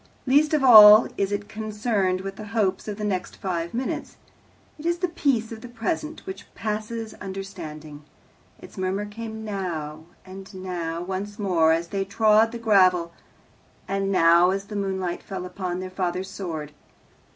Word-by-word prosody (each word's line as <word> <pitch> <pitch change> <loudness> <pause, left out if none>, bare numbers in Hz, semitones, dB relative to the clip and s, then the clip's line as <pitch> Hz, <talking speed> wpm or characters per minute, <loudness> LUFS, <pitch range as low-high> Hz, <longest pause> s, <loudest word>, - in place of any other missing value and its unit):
Least 295 +4 +4
of 290 - 0
all 215 -3 +10
is 200 0 -1
it 205 0 -3
concerned 210 -3 -1
with 195 0 -6
the 215 - -8
hopes 195 -2 0
of 205 -1 -4
the 215 - -5
next 195 -3 -2
five 170 -3 -3
minutes. 250 +3 -4 0.6
It 315 - -4
is 345 0 +1
the 365 +1 0
peace 275 -10 0
of 220 -1 -8
the 245 - -8
present, 305 +7 -4
which 380 0 -9
passes 220 +1 -4
understanding. 165 -7 -8 0.6
Its - - -12
murmur 190 +2 -1
came 220 +1 -7
"now," 160 -7 -5 0.2
and 190 +1 -10
"now" 175 -3 -4
once 195 +3 -5
more 175 -6 +2
as 165 +1 0
they 195 -1 -1
trod 215 +2 +3
the 235 - -5
gravel, 185 -6 +3 0.8
and 195 0 -1
"now," 170 -1 +5
as 195 +1 -2
the 210 +1 -8
moonlight 190 -3 -2
fell 190 -2 -6
upon 180 -1 -4
their 185 0 -6
father's 185 0 -3
sword. 160 -7 -5
195 Hz, 160 wpm, -24 LUFS, 180-220 Hz, 0.8 s, all